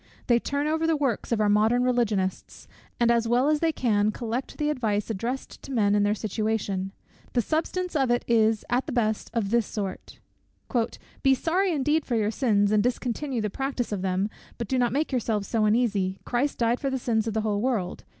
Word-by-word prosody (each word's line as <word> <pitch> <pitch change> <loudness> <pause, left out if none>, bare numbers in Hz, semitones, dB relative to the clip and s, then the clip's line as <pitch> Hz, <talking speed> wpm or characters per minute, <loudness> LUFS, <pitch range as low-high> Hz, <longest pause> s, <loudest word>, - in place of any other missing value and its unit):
They 240 -1 +4
turn 280 +4 -2
over 320 +1 +1
the 325 - +3
works 265 -7 -1
of 230 - +1
our 210 - +3
modern 220 +4 +3
Religionists, 220 -7 -1 0.3
and 235 0 +4
as 230 -1 +2
well 245 +5 +3
as 305 -1 +2
they 330 0 +2
can 215 -7 +1
collect 235 +3 -4
the 300 -1 +1
advice 220 -6 -1
addressed 235 +6 -4
to 275 - -9
men 205 -5 +2
in 205 - +3
their 205 +1 +2
situation: 215 -3 -2 0.4
the 245 - +3
substance 340 - -2
of 270 -4 +2
it 240 0 +1
is, 220 -2 +3
at 245 +4 0
the - - -3
best, 220 -4 0
of 220 -4 -1
this 235 -2 +2
sort; 200 -3 -5 1.0
"Be 270 -1 +4
sorry 360 +7 +1
indeed 300 +1 +1
for 245 - -2
your 215 -1 +1
sins, 210 -5 +2
and 215 -1 +4
discontinue 250 +2 -1
the 210 -2 -2
practice 270 -2 -3
of 200 -3 -2
them, 190 +2 0 0.3
but 235 - -4
do 260 +3 0
not 240 -2 +2
make 290 +5 0
yourselves 225 -5 -1
so 220 -2 +1
uneasy. 210 -4 +1
Christ 260 +4 0
died 235 +1 +1
for 275 - -1
the 265 - -1
sins 225 -3 0
of 220 - -2
the 220 - +1
whole 210 -1 0
world. 230 -7 -1
235 Hz, 210 wpm, -26 LUFS, 210-265 Hz, 1.0 s, They